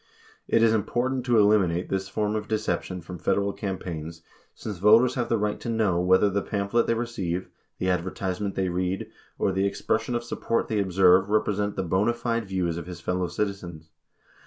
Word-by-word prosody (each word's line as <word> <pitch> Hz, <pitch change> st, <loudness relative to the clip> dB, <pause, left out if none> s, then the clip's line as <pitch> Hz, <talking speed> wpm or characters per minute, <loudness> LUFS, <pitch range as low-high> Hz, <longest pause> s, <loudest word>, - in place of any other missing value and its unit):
It 115 Hz, -, +3 dB
is 115 Hz, -1 st, +5 dB
important 125 Hz, +4 st, -1 dB
to 120 Hz, -2 st, +4 dB
eliminate 100 Hz, -5 st, +3 dB
this 95 Hz, 0 st, -2 dB
form 105 Hz, 0 st, -1 dB
of 105 Hz, 0 st, -3 dB
deception 105 Hz, -4 st, -2 dB
from 90 Hz, +1 st, -9 dB
Federal 100 Hz, +4 st, 0 dB
campaigns 85 Hz, -5 st, -5 dB, 0.3 s
since 105 Hz, -5 st, -6 dB
voters 115 Hz, +6 st, +6 dB
have 120 Hz, -2 st, -2 dB
the 115 Hz, -, +2 dB
right, 105 Hz, 0 st, -1 dB
to -, -, -5 dB
know 110 Hz, -6 st, +1 dB
whether 95 Hz, +3 st, +4 dB
the 100 Hz, 0 st, 0 dB
pamphlet 100 Hz, +4 st, 0 dB
they 115 Hz, -, +2 dB
receive, 100 Hz, -7 st, -3 dB, 0.3 s
the 95 Hz, 0 st, 0 dB
advertisement 95 Hz, +2 st, -2 dB
they 95 Hz, -1 st, 0 dB
read, 90 Hz, +2 st, -2 dB, 0.3 s
or 95 Hz, -, +1 dB
the 95 Hz, +1 st, +1 dB
expression 110 Hz, +4 st, -1 dB
of 120 Hz, -, -1 dB
sup 120 Hz, -, -7 dB
port 115 Hz, -, 0 dB
they 110 Hz, -, 0 dB
observe 95 Hz, 0 st, +4 dB
represent 105 Hz, -1 st, 0 dB
the 95 Hz, -, -1 dB
bona 95 Hz, +6 st, +1 dB
fide 115 Hz, -2 st, -2 dB
views 90 Hz, -3 st, -1 dB
of 85 Hz, 0 st, -6 dB
his 90 Hz, -2 st, -7 dB
fellow 90 Hz, +1 st, -1 dB
citizens. 85 Hz, -4 st, -4 dB
100 Hz, 185 wpm, -26 LUFS, 90-110 Hz, 0.3 s, voters